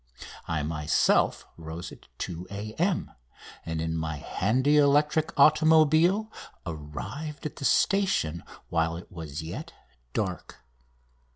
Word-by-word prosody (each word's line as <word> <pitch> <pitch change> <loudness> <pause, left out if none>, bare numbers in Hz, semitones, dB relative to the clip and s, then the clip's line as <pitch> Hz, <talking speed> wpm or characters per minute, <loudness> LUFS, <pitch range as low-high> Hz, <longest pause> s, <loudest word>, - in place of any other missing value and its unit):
I 80 -3 -1
myself 75 -1 +2
rose 85 +2 -7
at - - -14
2 90 +1 -5
A.M., 110 - -2 0.5
and 80 -1 -3
in 80 0 -2
my 80 -1 -2
handy 130 - +1
electric 150 +2 +3
automobile 160 +7 +5 0.3
arrived 95 - -6
at 150 - -5
the 140 - -4
station 130 - +2 0.3
while 80 0 0
it 90 - -11
was 80 -3 -6
yet 80 - -7 0.4
dark. 95 - -4
95 Hz, 110 wpm, -27 LUFS, -, 0.5 s, automobile